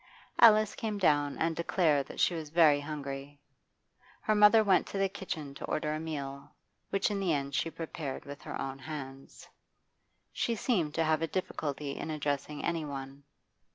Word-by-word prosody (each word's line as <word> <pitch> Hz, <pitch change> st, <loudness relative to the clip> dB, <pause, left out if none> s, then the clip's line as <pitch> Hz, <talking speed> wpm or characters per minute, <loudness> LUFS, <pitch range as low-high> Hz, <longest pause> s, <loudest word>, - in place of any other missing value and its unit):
Alice 215 Hz, -2 st, +7 dB
came 215 Hz, -2 st, -3 dB
down 145 Hz, -6 st, +2 dB
and 165 Hz, 0 st, 0 dB
declared 160 Hz, -4 st, +1 dB
that -, -, -9 dB
she -, -, +3 dB
was 160 Hz, -3 st, -5 dB
very 155 Hz, -3 st, +5 dB
hungry. 145 Hz, -1 st, -6 dB, 0.8 s
Her 215 Hz, -, +1 dB
mother 210 Hz, +1 st, +7 dB
went 195 Hz, -3 st, +3 dB
to -, -, -5 dB
the 195 Hz, 0 st, +2 dB
kitchen 165 Hz, -7 st, -6 dB
to -, -, -7 dB
order 150 Hz, 0 st, -1 dB
a 155 Hz, -, -2 dB
meal, 140 Hz, -4 st, -6 dB, 0.3 s
which 195 Hz, +1 st, +1 dB
in 200 Hz, -, -1 dB
the 190 Hz, -3 st, +1 dB
end 140 Hz, -1 st, -2 dB
she 165 Hz, -, 0 dB
prepared 160 Hz, -4 st, -6 dB
with 145 Hz, +1 st, -9 dB
her -, -, -6 dB
own 135 Hz, 0 st, -4 dB
hands. 135 Hz, -2 st, -8 dB, 0.9 s
She 235 Hz, -, 0 dB
seemed 185 Hz, -, 0 dB
to 165 Hz, -, +2 dB
have 155 Hz, 0 st, +2 dB
a 165 Hz, -, 0 dB
difficulty 150 Hz, -5 st, -3 dB
in -, -, -5 dB
addressing 145 Hz, -1 st, -2 dB
any 170 Hz, -2 st, -1 dB
one. 135 Hz, -1 st, -7 dB
155 Hz, 175 wpm, -31 LUFS, 140-180 Hz, 0.9 s, Alice